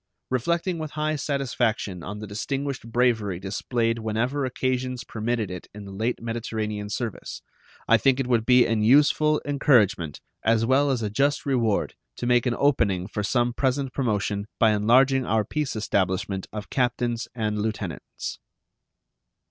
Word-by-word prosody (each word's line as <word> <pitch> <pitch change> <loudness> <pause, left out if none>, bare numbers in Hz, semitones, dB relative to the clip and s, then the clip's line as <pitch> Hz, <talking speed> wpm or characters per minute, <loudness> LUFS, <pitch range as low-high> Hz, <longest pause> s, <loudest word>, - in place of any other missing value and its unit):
Reflecting 170 +7 0
with 155 -1 -5
high 155 0 0
satisfaction 125 - -1
on 100 +4 -6
the 105 - -6
distinguished 135 +4 -4
bravery 110 -7 +1
displayed 115 +4 -1
whenever 120 +6 -1
occasions 130 0 -2
permitted 110 -4 -2
it 90 -2 -7
in 105 -1 -8
the 100 - -9
late 110 +5 -2
Mediterranean 110 -3 -3
service, 110 0 -5 0.4
I - - +6
think 135 -1 +2
it 135 - 0
would 120 -3 +2
be 125 +1 +5
an 115 -2 0
useful 150 +5 +4
encouragement 115 - +2 0.2
as 115 0 +3
well 135 +4 +3
as 125 -4 0
a 105 - -2
just 140 +6 +1
reward 120 -7 +1 0.2
to - - -5
make 120 0 +3
an 120 - +1
opening 110 -10 +2
for 105 +1 -4
some 120 +3 +1
present 135 +1 -1
promotion 105 -5 -1
by 110 -2 +4
enlarging 130 +6 +4
our 110 -3 +1
peace 150 -4 -2
establishment 95 -2 -1
of 105 -1 -7
captains 120 -2 0
and 105 -2 -1
lieutenants. 105 -6 -5
115 Hz, 150 wpm, -25 LUFS, 105-130 Hz, 0.4 s, I